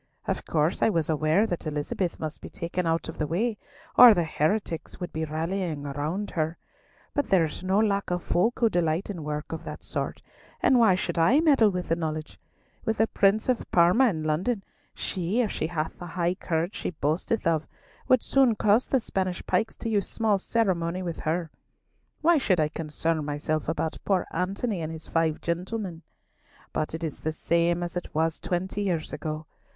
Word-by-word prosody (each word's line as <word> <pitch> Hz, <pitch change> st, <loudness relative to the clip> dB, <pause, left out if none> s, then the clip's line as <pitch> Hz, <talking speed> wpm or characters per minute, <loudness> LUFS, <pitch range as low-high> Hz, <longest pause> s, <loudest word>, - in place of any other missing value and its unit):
Of -, -, -3 dB
course 155 Hz, +1 st, +1 dB
I -, -, +5 dB
was 165 Hz, -6 st, +1 dB
aware 155 Hz, +7 st, +3 dB
that 175 Hz, -6 st, -3 dB
Elizabeth 155 Hz, +4 st, -2 dB
must 155 Hz, -1 st, -5 dB
be -, -, -8 dB
taken 170 Hz, +1 st, -3 dB
out 165 Hz, 0 st, 0 dB
of 160 Hz, -, -8 dB
the 150 Hz, -, 0 dB
way, 210 Hz, +7 st, -1 dB, 0.4 s
or 240 Hz, -3 st, +10 dB
the 175 Hz, -, +2 dB
heretics 165 Hz, +2 st, -1 dB
would 180 Hz, -, -5 dB
be 160 Hz, 0 st, -1 dB
rallying 160 Hz, 0 st, -2 dB
round 150 Hz, +8 st, -3 dB
her; 160 Hz, 0 st, -1 dB, 0.6 s
but 285 Hz, -, -1 dB
there 185 Hz, -4 st, +5 dB
is 155 Hz, -, -6 dB
no 190 Hz, +1 st, +2 dB
lack 200 Hz, -2 st, +1 dB
of 180 Hz, -1 st, -1 dB
folk 220 Hz, +7 st, +1 dB
who 235 Hz, -, +4 dB
delight 175 Hz, 0 st, 0 dB
in 170 Hz, -6 st, -6 dB
work 150 Hz, 0 st, -4 dB
of 165 Hz, 0 st, -5 dB
that -, -, -7 dB
sort, -, -, -3 dB, 0.4 s
and 255 Hz, -, +4 dB
why 220 Hz, -6 st, +6 dB
should 180 Hz, -, -2 dB
I 235 Hz, -, +5 dB
meddle 280 Hz, -9 st, +5 dB
with 180 Hz, -2 st, -4 dB
the 165 Hz, -, +3 dB
knowledge? 155 Hz, -2 st, -4 dB, 0.4 s
With 225 Hz, -, -1 dB
the 220 Hz, -, +4 dB
Prince 205 Hz, 0 st, +2 dB
of 255 Hz, -2 st, +1 dB
Parma 180 Hz, +10 st, +5 dB
in 160 Hz, -6 st, -3 dB
London, 185 Hz, +8 st, 0 dB, 0.3 s
she, 190 Hz, +6 st, -1 dB
if 220 Hz, -, 0 dB
she 155 Hz, -, -2 dB
hath 160 Hz, -2 st, -3 dB
the 175 Hz, -, -7 dB
high 175 Hz, +1 st, 0 dB
courage 170 Hz, 0 st, -2 dB
she -, -, -3 dB
boasteth 165 Hz, +7 st, -1 dB
of, 160 Hz, -2 st, +1 dB, 0.4 s
would 255 Hz, -2 st, +4 dB
soon 265 Hz, -4 st, +4 dB
cause 210 Hz, +4 st, +3 dB
the 265 Hz, -, +2 dB
Spanish 190 Hz, -5 st, -2 dB
pikes 190 Hz, +5 st, 0 dB
to -, -, -6 dB
use 205 Hz, -3 st, 0 dB
small 215 Hz, -3 st, +1 dB
ceremony 185 Hz, -5 st, 0 dB
with 170 Hz, -2 st, -4 dB
her! 160 Hz, 0 st, -1 dB, 0.7 s
Why 335 Hz, 0 st, +5 dB
should 190 Hz, -10 st, +2 dB
I 155 Hz, -1 st, +2 dB
concern 160 Hz, 0 st, -2 dB
myself 145 Hz, +1 st, -2 dB
about 160 Hz, 0 st, -2 dB
poor 190 Hz, -3 st, +1 dB
Antony 195 Hz, +1 st, -1 dB
and 160 Hz, 0 st, -3 dB
his 160 Hz, -1 st, -7 dB
five 165 Hz, -2 st, 0 dB
gentlemen? 180 Hz, 0 st, -3 dB, 0.7 s
But 155 Hz, +1 st, -1 dB
it 165 Hz, -, -6 dB
is 155 Hz, -3 st, -3 dB
the 160 Hz, -, -2 dB
same 170 Hz, +2 st, +1 dB
as 175 Hz, 0 st, -5 dB
it 175 Hz, -3 st, -5 dB
was 160 Hz, +1 st, +1 dB
twenty 185 Hz, +3 st, -2 dB
years 175 Hz, -6 st, -1 dB
ago. 155 Hz, 0 st, -4 dB
175 Hz, 195 wpm, -27 LUFS, 160-205 Hz, 0.7 s, or